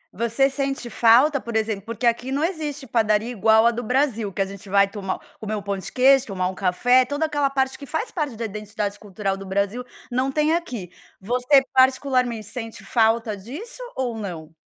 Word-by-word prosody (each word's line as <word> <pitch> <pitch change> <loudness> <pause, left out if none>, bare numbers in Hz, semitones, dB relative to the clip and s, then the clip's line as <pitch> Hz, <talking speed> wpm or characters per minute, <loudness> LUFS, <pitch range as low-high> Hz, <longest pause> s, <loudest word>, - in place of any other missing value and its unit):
Você 235 +5 +2
sente 270 -3 -3
falta, 250 +6 +5
por 235 -1 -6
exemplo 220 -2 0
porque 230 +2 -4
aqui 240 +3 +1
não 285 +3 0
existe 305 -5 -3
padaria 220 -1 +1
igual 220 +1 +4
a 235 - +5
do 240 +1 -4
Brasil, 240 -4 0
que 195 - 0
a - - -4
gente 195 0 -10
vai 200 0 +4
tomar 195 -2 -4 0.2
comer 215 0 -3
um 205 - -4
pão 200 0 -2
de 190 - -7
queijo, 270 0 +4
tomar 185 -2 -1
um - - -5
café, 245 +8 +3
toda 285 +5 -1
aquela 290 -3 0
parte 265 -1 -1
que 280 - -9
faz 440 - -3
parte 295 -8 -3
da 230 +1 -4
identidade 210 -1 -4
cultural 200 -1 -3
do 195 - -8
Brasil, 200 +5 -1 0.3
não 260 +2 0
tem 305 +2 +2
aqui. 240 - -3 0.3
Você, 250 +6 +3
particularmente, 260 -4 +2
sente 225 -1 -7
falta 225 0 +2
disso 315 - -8
ou 245 -3 -2
não? 170 -7 -7
235 Hz, 195 wpm, -23 LUFS, 205-270 Hz, 0.3 s, falta